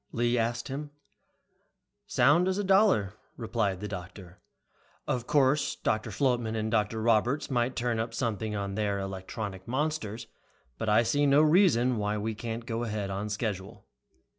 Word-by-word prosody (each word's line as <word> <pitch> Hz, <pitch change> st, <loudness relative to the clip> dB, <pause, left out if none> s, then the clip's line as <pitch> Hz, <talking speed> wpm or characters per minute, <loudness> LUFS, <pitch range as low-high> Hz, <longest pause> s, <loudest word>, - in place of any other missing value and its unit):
Lee 120 Hz, +1 st, +1 dB
asked 120 Hz, 0 st, -1 dB
him. 145 Hz, +2 st, -5 dB, 1.2 s
"Sound 150 Hz, +9 st, +4 dB
as 190 Hz, 0 st, 0 dB
a 205 Hz, -, 0 dB
dollar," 190 Hz, -, +3 dB, 0.2 s
replied 110 Hz, -6 st, -1 dB
the 105 Hz, -, -3 dB
doctor. 90 Hz, -2 st, -9 dB, 0.7 s
"Of 125 Hz, -1 st, -2 dB
course 140 Hz, 0 st, +2 dB
Dr. 110 Hz, +1 st, -1 dB
Flotman 120 Hz, 0 st, 0 dB
or 110 Hz, 0 st, -1 dB
Dr. 110 Hz, 0 st, 0 dB
Roberts 120 Hz, +6 st, +2 dB
might 125 Hz, 0 st, 0 dB
turn 120 Hz, -2 st, -1 dB
up 115 Hz, 0 st, -3 dB
something 110 Hz, -2 st, -2 dB
on 100 Hz, -1 st, -3 dB
their 100 Hz, -1 st, -1 dB
electronic 95 Hz, 0 st, -6 dB
monsters, 125 Hz, -4 st, -2 dB, 0.5 s
but 110 Hz, -, -1 dB
I 110 Hz, +3 st, +5 dB
see 145 Hz, +5 st, +2 dB
no 140 Hz, +2 st, +5 dB
reason 150 Hz, -, +4 dB
why 105 Hz, 0 st, -1 dB
we 110 Hz, +2 st, -2 dB
can't 115 Hz, +2 st, -5 dB
go 115 Hz, -1 st, -3 dB
ahead 105 Hz, -4 st, -3 dB
on 100 Hz, +2 st, -3 dB
schedule." 105 Hz, -3 st, -4 dB
115 Hz, 155 wpm, -29 LUFS, 105-130 Hz, 1.2 s, I